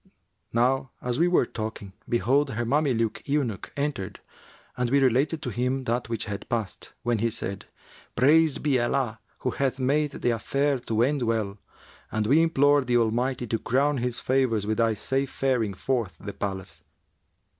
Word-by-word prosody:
Now 130 +3 +2
as 125 +2 -2
we 170 - +4
were 175 -7 +3
talking, 110 -4 -6 0.2
behold 130 +6 +2
her 120 0 -2
Mameluke 125 -4 +1
eunuch 135 -9 -1
entered 140 -9 -3 0.6
and 125 -1 0
we 140 - +4
related 135 +4 +2
to 125 - -3
him 125 +4 -1
that 120 -1 -1
which 115 -2 -2
had 100 -1 -6
passed, 110 -5 -3
when 120 -2 +1
he 115 +2 +1
said, 100 -3 -5 0.5
'Praised 155 +4 +4
be 140 -4 +3
Allah 120 -2 0 0.2
who - - 0
hath 135 -1 -1
made 140 +3 +1
the 120 - 0
affair 140 +4 0
to 115 -1 0
end 140 +2 +1
well, 110 -4 -1 0.5
and 110 -1 0
we 145 +9 +5
implore 145 -3 +4
the 120 -1 +2
Almighty 120 +2 0
to 115 -1 -1
crown 140 +4 +1
His 125 0 -2
favours 125 -5 +1
with 110 +1 -1
thy 115 -1 +3
safe 135 +6 -1
faring 125 -8 0
forth 115 -7 -2
the 100 0 -6
palace!' 95 -5 -5
125 Hz, 165 wpm, -26 LUFS, 110-135 Hz, 0.6 s, we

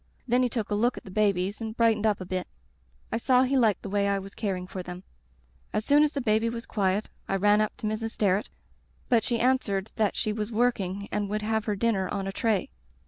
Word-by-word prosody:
Then 245 +1 +3
he 250 - +2
took 225 -4 -3
a - - +2
look 235 +4 +1
at - - -8
the 190 - -11
babies 200 0 +1
and 220 0 -5
brightened 220 -2 +3
up 210 -2 +1
a 185 - -6
bit. 185 0 -3 0.6
I - - +1
saw 255 +1 +4
he 265 +1 +1
liked 225 -7 +3
the 200 - -5
way 200 0 +1
I 200 0 +2
was 195 0 -7
caring 190 -4 -2
for 185 0 -6
them. 180 +1 -8 0.7
"As 215 - -1
soon 290 +1 +5
as 300 0 +3
the 280 - -1
baby 220 -1 +2
was 230 0 -5
quiet 200 0 0 0.2
I 195 - +1
ran 205 +2 +4
up 215 - -1
to - - -6
Mrs. 215 +1 -1
Sterret, 200 0 +1 0.6
but 235 -3 +4
she 235 -2 0
answered 220 -6 +1
that 215 -3 +1
she 215 - -1
was 210 +1 -3
working 200 -4 0
and 205 -1 -1
would 210 +1 -2
have 220 0 0
her 210 - 0
dinner 195 -3 0
on 195 -1 -2
a 195 - -2
tray. 215 -2 0
210 Hz, 240 wpm, -27 LUFS, 195-230 Hz, 0.7 s, soon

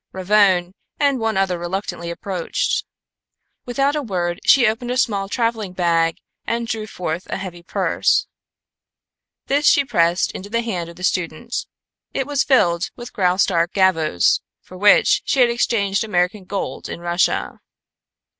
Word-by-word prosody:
Ravone 190 -2 +3 0.3
and 280 -3 +2
one 225 -2 -1
other 190 -2 0
reluctantly 175 -1 -4
approached. 185 - -2 0.8
Without 275 +4 +1
a 300 - -1
word 175 -8 -2
she 260 -3 +5
opened 235 +3 -1
a 250 - -1
small 200 -6 0
traveling 225 -5 -1
bag 165 -2 +1 0.3
and 235 0 -2
drew 225 -2 -4
forth 175 -3 -4
a - - -2
heavy 175 -3 -7
purse. 170 - +1 1.2
This 290 +2 +1
she 280 - +5
pressed 170 -5 +1
into 195 +2 -8
the 230 +2 -1
hand 180 -7 -3
of 170 - -12
the 180 - -11
student. 180 +5 -2 0.6
It 270 - 0
was 290 0 0
filled 175 - +2
with 240 0 -10
Graustark 180 -2 +1
gavvos, 165 - +3 0.2
for 185 - -15
which 205 +2 +4
she 275 - 0
had 240 -1 +5
exchanged 205 -4 0
American 185 -1 -1
gold 200 +1 -4
in - - -6
Russia. 175 +1 0
195 Hz, 145 wpm, -20 LUFS, 175-235 Hz, 1.2 s, she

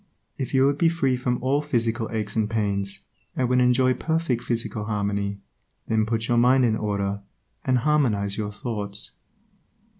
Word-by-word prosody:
If 130 - -3
you 130 0 +5
would 140 +1 +1
be 165 - +5
free 140 -6 +1
from 125 -1 -1
all 140 +3 +2
physical 120 -5 -1
aches 105 -2 -3
and 110 -2 +1
pains, 100 -3 -1 0.3
and 130 - +1
would 125 +1 +3
enjoy 125 +1 +4
perfect 155 -3 -1
physical 115 -3 -2
harmony, 100 -1 -1 0.5
then 110 -1 +1
put 115 0 -1
your 120 -1 +3
mind 125 +2 +5
in 110 -2 +2
order, 100 -1 -2 0.4
and 130 -1 +2
harmonize 115 -8 +1
your 105 -1 -3
thoughts. 105 - -4
115 Hz, 160 wpm, -25 LUFS, 105-130 Hz, 0.5 s, you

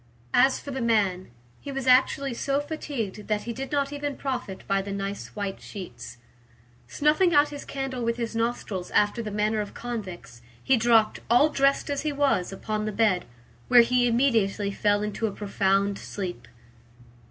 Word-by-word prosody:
As 265 0 +4
for 285 - -8
the 265 -1 -3
man, 200 -6 +1 0.3
he 280 - -7
was 270 -1 -4
actually 260 +1 +3
so 275 +4 0
fatigued 280 -9 -5
that 210 -1 0
he 235 - -4
did 270 +3 -6
not 285 -1 0
even 290 -1 -4
profit 250 -8 -4
by 195 0 +1
the 200 +1 -6
nice 200 0 -4
white 200 -2 -4
sheets. 120 - -9 0.7
Snuffing 310 - +2
out 290 +1 +5
his 290 -1 -8
candle 270 -2 -4
with 230 0 0
his 230 -1 -3
nostrils 225 -5 -2
after 210 +3 +3
the 220 - -4
manner 210 +1 0
of 205 - -7
convicts, 185 - -7 0.2
he 265 - +4
dropped, 225 -2 +3
all 245 +6 +5
dressed 275 -1 +2
as 285 - -1
he 305 - -1
was, 280 -11 +1
upon 215 +2 -3
the 215 - -2
bed, 205 -3 +2 0.4
where 245 - +8
he 245 +1 +2
immediately 225 -5 +2
fell 205 +1 +1
into 210 +2 -2
a - - -3
profound 200 0 0
sleep. 180 - -6
230 Hz, 175 wpm, -26 LUFS, 200-270 Hz, 0.7 s, where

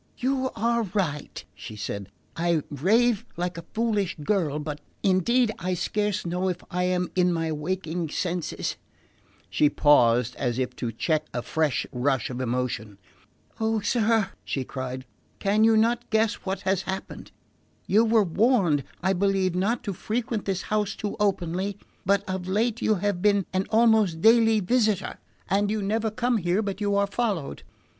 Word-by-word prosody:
"You 260 0 0
are 235 +2 +1
right," 175 -8 -3
she 105 +2 -9
said; 100 -2 -5 0.3
"I 170 -2 +1
rave 215 - +2
like 180 +1 -2
a 165 - -11
foolish 210 -5 0
girl; 160 -5 0
but 150 -1 -5 0.2
indeed 215 +6 +3
I 180 +1 -1
scarce 205 +2 -1
know 180 +2 -1
if 180 -1 -4
I 180 0 0
am 180 0 0
in 180 -1 +3
my 165 -1 -1
waking 165 +1 -3
senses" 175 +1 -3 0.7
She 150 - +3
paused, 125 -5 +4
as 120 -3 -1
if 125 -1 -2
to 120 - -3
check 155 +6 -1
a 120 - -2
fresh 155 -4 0
rush 130 -1 0
of 125 +1 -4
emotion. 120 -4 -2 0.6
"Oh, 220 0 +1
sir," 225 -3 +2
she 135 - -2
cried, 130 0 -6 0.3
"can 210 +2 +2
you 225 0 +5
not 235 +2 +1
guess 220 0 +2
what 190 0 -2
has 190 -1 +1
happened? 190 0 -6 0.5
You 215 +4 +4
were 225 -1 +4
warned, 190 - +2 0.2
I 190 +1 +3
believe, 190 -1 +1
not 200 +7 0
to 200 - -3
frequent 220 +3 -3
this 195 -2 -1
house 210 -1 -1
too 210 - -4
openly; 195 -1 0 0.3
but 200 +1 +2
of 185 -1 -3
late 220 +4 0
you 215 - +3
have 200 -1 -1
been 200 -2 +3
an 190 +1 0
almost 220 -6 +4
daily 225 +1 +5
visitor, 215 -1 +1 0.3
and 200 +2 +1
you 215 -1 -1
never 220 +3 0
come 240 +2 0
here 180 +2 0
but 200 0 -4
you 205 -1 +1
are 200 0 +3
followed. 200 -8 -2
190 Hz, 165 wpm, -26 LUFS, 160-215 Hz, 0.7 s, you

